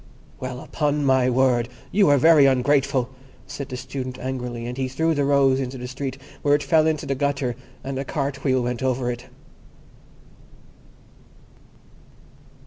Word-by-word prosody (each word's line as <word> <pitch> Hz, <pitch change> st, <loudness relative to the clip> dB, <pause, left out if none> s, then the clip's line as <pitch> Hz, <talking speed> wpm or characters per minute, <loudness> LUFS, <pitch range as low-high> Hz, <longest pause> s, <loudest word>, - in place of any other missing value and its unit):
"Well, 130 Hz, 0 st, -5 dB
upon 150 Hz, -1 st, -1 dB
my 130 Hz, -2 st, +3 dB
word, 125 Hz, -1 st, +2 dB, 0.2 s
you 200 Hz, -5 st, +4 dB
are 145 Hz, -, +5 dB
very 150 Hz, 0 st, +6 dB
ungrateful," 135 Hz, 0 st, +2 dB, 0.3 s
said 140 Hz, -, -7 dB
the 125 Hz, -, -5 dB
Student 130 Hz, 0 st, -6 dB
angrily; 125 Hz, -2 st, -4 dB
and 120 Hz, +1 st, -5 dB
he 130 Hz, 0 st, -2 dB
threw 160 Hz, +6 st, 0 dB
the 145 Hz, -2 st, 0 dB
rose 135 Hz, -1 st, +3 dB
into 130 Hz, 0 st, -4 dB
the 125 Hz, 0 st, -6 dB
street, 130 Hz, +1 st, -5 dB, 0.2 s
where 145 Hz, 0 st, +4 dB
it 145 Hz, -, -1 dB
fell 160 Hz, -2 st, +3 dB
into 155 Hz, -2 st, -1 dB
the 135 Hz, -, -1 dB
gutter, 135 Hz, -3 st, -1 dB, 0.3 s
and 135 Hz, 0 st, -4 dB
a -, -, -2 dB
cart 140 Hz, 0 st, -3 dB
wheel 130 Hz, -3 st, +2 dB
went 125 Hz, 0 st, -3 dB
over 130 Hz, -1 st, 0 dB
it. 120 Hz, 0 st, -8 dB
135 Hz, 155 wpm, -23 LUFS, 125-140 Hz, 0.3 s, very